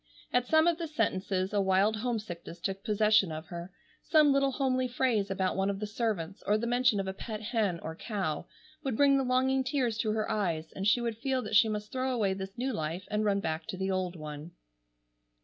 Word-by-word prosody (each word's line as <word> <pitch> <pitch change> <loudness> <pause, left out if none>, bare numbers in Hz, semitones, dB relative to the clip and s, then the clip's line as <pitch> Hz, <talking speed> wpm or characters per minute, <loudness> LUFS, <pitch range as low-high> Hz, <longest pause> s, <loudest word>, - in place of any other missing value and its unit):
At 250 0 +2
some 315 0 +5
of 340 0 +2
the 335 - -3
sentences 190 - -1
a 205 - +3
wild 195 +3 +3
homesickness 215 -7 -4
took 195 +2 -3
possession 210 -4 +3
of 155 +1 -7
her. 175 0 -7 0.3
Some 305 -3 +5
little 275 -1 +2
homely 255 -1 +1
phrase 240 -5 +1
about 190 -1 0
one 195 +1 +1
of 195 -1 -2
the 210 - -2
servants, 205 -5 -2
or 210 - +4
the 225 - -2
mention 245 -3 +3
of 195 - -2
a 190 - -2
pet 215 +2 -6
hen 215 -5 -1
or 160 0 -6
cow, 195 -6 -3 0.4
would 265 -6 -2
bring 280 -1 +5
the - - +1
longing 260 +1 +2
tears 255 -5 0
to 215 - 0
her 215 -1 -1
eyes, 170 -6 -1
and 195 +1 -1
she 240 +3 +4
would 230 -2 -3
feel 260 0 0
that 220 - -3
she 220 +1 +6
must 210 0 -4
throw 260 0 -1
away 210 -6 +1
this 190 0 -7
new 260 +2 -1
life 165 0 -3
and 210 0 +1
run 200 -1 +2
back 160 -2 -3
to 185 - -5
the 190 +1 -1
old 185 -1 -1
one. 155 +1 -8
210 Hz, 220 wpm, -30 LUFS, 190-250 Hz, 0.4 s, she